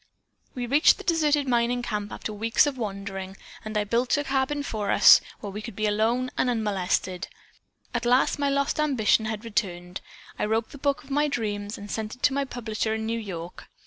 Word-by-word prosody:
"'We 250 Hz, -1 st, -3 dB
reached 285 Hz, +6 st, +5 dB
this -, -, -10 dB
deserted 300 Hz, -4 st, +2 dB
mining 245 Hz, 0 st, +1 dB
camp 210 Hz, -3 st, -3 dB
after 215 Hz, -, -5 dB
weeks 225 Hz, +6 st, +3 dB
of 290 Hz, -2 st, -1 dB
wandering 195 Hz, -4 st, -5 dB, 0.3 s
and 215 Hz, 0 st, -4 dB
I 210 Hz, -, +2 dB
built 235 Hz, +4 st, 0 dB
for -, -, +4 dB
us -, -, -7 dB
a -, -, -8 dB
cabin 275 Hz, +2 st, 0 dB, 0.8 s
where 205 Hz, -, -5 dB
we 210 Hz, +2 st, -6 dB
could 220 Hz, -2 st, -8 dB
be 215 Hz, -, -1 dB
alone 225 Hz, +5 st, +1 dB
and 250 Hz, -, +2 dB
unmolested. 190 Hz, -5 st, -1 dB, 0.7 s
At 240 Hz, -1 st, -1 dB
last 250 Hz, +4 st, +3 dB
my 285 Hz, -1 st, +1 dB
lost 280 Hz, +2 st, 0 dB
ambition 250 Hz, -7 st, +2 dB
had 220 Hz, 0 st, -4 dB
returned. 180 Hz, -5 st, -3 dB, 0.4 s
I -, -, +1 dB
wrote 220 Hz, +1 st, -1 dB
the 285 Hz, -, -11 dB
book 280 Hz, 0 st, 0 dB
of 275 Hz, -, -14 dB
my 295 Hz, +2 st, +2 dB
dreams 210 Hz, -5 st, -3 dB
and 205 Hz, 0 st, -8 dB
sent 220 Hz, -1 st, -4 dB
it 250 Hz, -, -27 dB
to 280 Hz, -, +4 dB
my 280 Hz, 0 st, 0 dB
publisher 220 Hz, -3 st, -3 dB
in 220 Hz, 0 st, -3 dB
New 230 Hz, +1 st, -1 dB
York. 180 Hz, -5 st, -8 dB
225 Hz, 205 wpm, -26 LUFS, 210-265 Hz, 0.8 s, reached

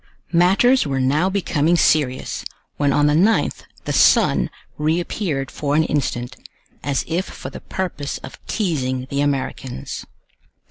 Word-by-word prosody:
Matters 195 Hz, -, +4 dB
were 135 Hz, -1 st, -1 dB
now 145 Hz, +8 st, +2 dB
becoming 175 Hz, -4 st, +1 dB
serious, 145 Hz, -6 st, +1 dB, 0.3 s
when 145 Hz, -1 st, +2 dB
on 145 Hz, +2 st, +3 dB
the 150 Hz, -, +4 dB
9th 195 Hz, +9 st, +2 dB, 0.2 s
the -, -, -2 dB
sun -, -, +4 dB, 0.3 s
reappeared 155 Hz, -2 st, -1 dB
for 145 Hz, -1 st, -1 dB
an 160 Hz, -, +4 dB
instant, 130 Hz, -4 st, -2 dB, 0.5 s
as 140 Hz, -2 st, -1 dB
if 175 Hz, +4 st, -1 dB
for -, -, -8 dB
the -, -, -9 dB
purpose 170 Hz, -7 st, -4 dB
of 130 Hz, -, -11 dB
teasing 130 Hz, -, -1 dB
the 140 Hz, 0 st, 0 dB
Americans. 135 Hz, -, -3 dB
150 Hz, 135 wpm, -21 LUFS, 135-175 Hz, 0.5 s, Matters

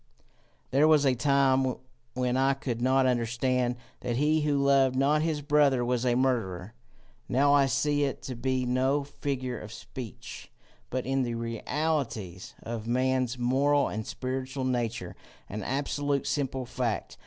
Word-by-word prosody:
There 140 Hz, +4 st, +4 dB
was 155 Hz, -2 st, +5 dB
a 135 Hz, -, +4 dB
time 135 Hz, 0 st, +2 dB, 0.4 s
when 125 Hz, 0 st, 0 dB
I 135 Hz, +1 st, +3 dB
could 120 Hz, -4 st, -4 dB
not 130 Hz, +1 st, +3 dB
understand 125 Hz, +1 st, +1 dB, 0.2 s
that 120 Hz, -1 st, -2 dB
he 155 Hz, +3 st, +2 dB
who 150 Hz, -1 st, +1 dB
loved 135 Hz, -2 st, +3 dB
not 145 Hz, +3 st, +3 dB
his 155 Hz, -2 st, -1 dB
brother 140 Hz, -4 st, +3 dB
was 125 Hz, 0 st, 0 dB
a 120 Hz, -, +3 dB
murderer: 110 Hz, -7 st, -1 dB, 0.6 s
now 140 Hz, +3 st, +4 dB
I 140 Hz, -1 st, +5 dB
see 145 Hz, +1 st, +1 dB
it 135 Hz, -1 st, -4 dB
to 135 Hz, -2 st, -5 dB
be 130 Hz, +1 st, -1 dB
no 130 Hz, +3 st, +1 dB
figure 130 Hz, -4 st, -4 dB
of 105 Hz, -, -9 dB
speech, 115 Hz, -1 st, -9 dB, 0.4 s
but, 130 Hz, 0 st, -2 dB
in 135 Hz, +1 st, +1 dB
the 120 Hz, -2 st, -2 dB
realities 115 Hz, -, -3 dB
of 115 Hz, -1 st, -5 dB
man's 130 Hz, 0 st, +1 dB
moral 140 Hz, +4 st, +2 dB
and 110 Hz, +1 st, -5 dB
spiritual 130 Hz, +1 st, -4 dB
nature, 120 Hz, -7 st, -2 dB, 0.3 s
an 105 Hz, +2 st, -5 dB
absolute 140 Hz, +3 st, -1 dB
simple 135 Hz, -3 st, -2 dB
fact. 120 Hz, -2 st, -3 dB
130 Hz, 150 wpm, -28 LUFS, 120-140 Hz, 0.6 s, was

